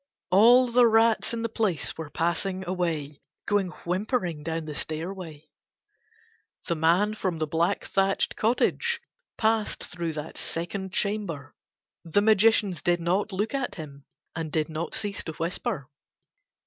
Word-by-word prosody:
All 235 +7 +7
the 240 0 +5
rats 225 0 +3
in 230 -1 -3
the - - +1
place 210 -8 -1
were 160 -2 -6
passing 175 +4 -1
away, 165 -6 -2 0.2
going 205 -2 +2 0.2
whimpering 180 - -1
down 160 +1 -3
the 155 - -5
stairway. 160 0 -5 1.2
The - - 0
man 170 +6 +3
from 185 -5 -2
the 155 - 0
black 165 +3 0
thatched 195 0 +1
cottage 460 - +1 0.4
passed 220 -1 +1
through 170 -2 -4
that 150 +1 -6
second 185 +3 -4
chamber: 195 -10 -2 0.5
the 175 +4 +2
magicians 215 -4 +4
did 175 0 +2
not 185 +5 0
look 205 +6 -1
at 270 -3 -2
him 140 -4 -9 0.3
and 160 -1 -4
did 155 0 0
not 160 +2 -4
cease 205 -2 -3
to 160 - -4
whisper. 165 - -3
180 Hz, 140 wpm, -27 LUFS, 160-215 Hz, 1.2 s, All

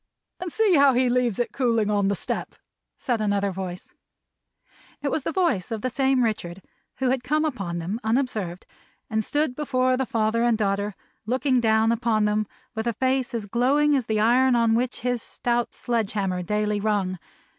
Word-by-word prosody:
"And 360 -1 -5
see 435 0 +3
how 280 -1 +6
he 250 0 +2
leaves 245 -4 +1
it 240 - -1
cooling 230 -5 +1
on 200 -1 +2
the 200 - +1
step!" - - -4 0.4
said 240 -4 -1
another 200 -1 +1
voice. 185 -1 -7 1.1
It 280 - 0
was 310 - 0
the 275 - -3
voice 335 - 0
of 225 -2 -3
the 255 - -1
same 265 0 +2
Richard, 195 -5 -3 0.3
who 260 -1 0
had 260 -1 -1
come 305 +4 +1
upon 195 - -3
them 180 +7 -3
unobserved, 220 -7 -1 0.5
and 220 0 +1
stood 290 +1 0
before 255 -3 +1
the 265 -1 -1
father 225 0 +1
and 240 -2 +3
daughter; 200 -1 -1 0.3
looking 255 +1 +1
down 220 0 +3
upon 225 -2 +1
them 210 0 0 0.3
with 220 0 -3
a 235 - +1
face 260 +1 0
as 225 -3 -3
glowing 275 +7 +2
as 260 -5 -1
the 220 -1 0
iron 245 +4 +4
on 230 -1 +3
which 240 +2 -1
his 245 -1 -1
stout 240 -1 -2
sledge 230 -4 -1
hammer 190 -3 -1
daily 210 +2 -1
rung. 200 -3 -1
230 Hz, 185 wpm, -24 LUFS, 210-255 Hz, 1.1 s, how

